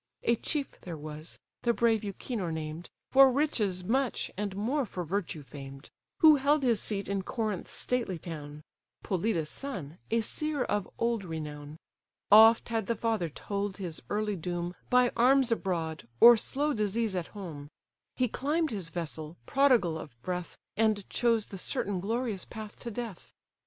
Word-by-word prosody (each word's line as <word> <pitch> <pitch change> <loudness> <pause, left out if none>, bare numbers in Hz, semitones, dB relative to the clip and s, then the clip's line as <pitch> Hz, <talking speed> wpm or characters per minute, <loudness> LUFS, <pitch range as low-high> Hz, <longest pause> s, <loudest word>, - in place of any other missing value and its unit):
A 235 - +3
chief 285 +4 -4
there 170 -3 -6
was, 155 +1 -8 0.2
the 235 - +2
brave 225 -2 +2
Euchenor 200 -2 -3
named, 160 +1 -5 0.2
For 270 0 +8
riches 215 -10 0
much, 255 +6 0
and 200 -1 -3
more 250 +9 0
for 185 -6 -5
virtue 170 -3 -3
famed. 135 0 -10 0.3
Who 310 -3 +9
held 285 +2 +2
his 235 -5 +3
seat 200 -2 -2
in 200 -1 -1
Corinth's 215 -2 -3
stately 235 -8 -1
town; 150 -2 -8 0.4
Polydus' 180 -4 0
son, 180 - -5
a 230 +1 +2
seer 300 +4 -1
of 205 -2 -1
old 230 -3 0
renown. 150 -3 -6 0.5
Oft 225 +3 +8
had 225 -3 -1
the 235 - +1
father 220 -6 0
told 200 +4 -3
his 175 -5 -5
early 210 0 0
doom, 175 0 -3 0.2
By 250 -1 +5
arms 255 +1 +4
abroad, 165 - -2
or 240 0 +10
slow 290 +6 0
disease 215 -1 0
at 175 -2 -2
home: 150 -7 -7 0.5
He 255 - +2
climb'd 300 +7 0
his 190 -6 -4
vessel, 160 -2 -5
prodigal 245 - +3
of 135 -7 -11
breath, 180 -1 -4 0.2
And 215 -2 +1
chose 230 -3 +2
the 195 - -8
certain 195 +1 -1
glorious 220 0 -2
path 215 -2 -8
to 240 - -5
death. 230 -4 -6
205 Hz, 155 wpm, -30 LUFS, 170-235 Hz, 0.5 s, or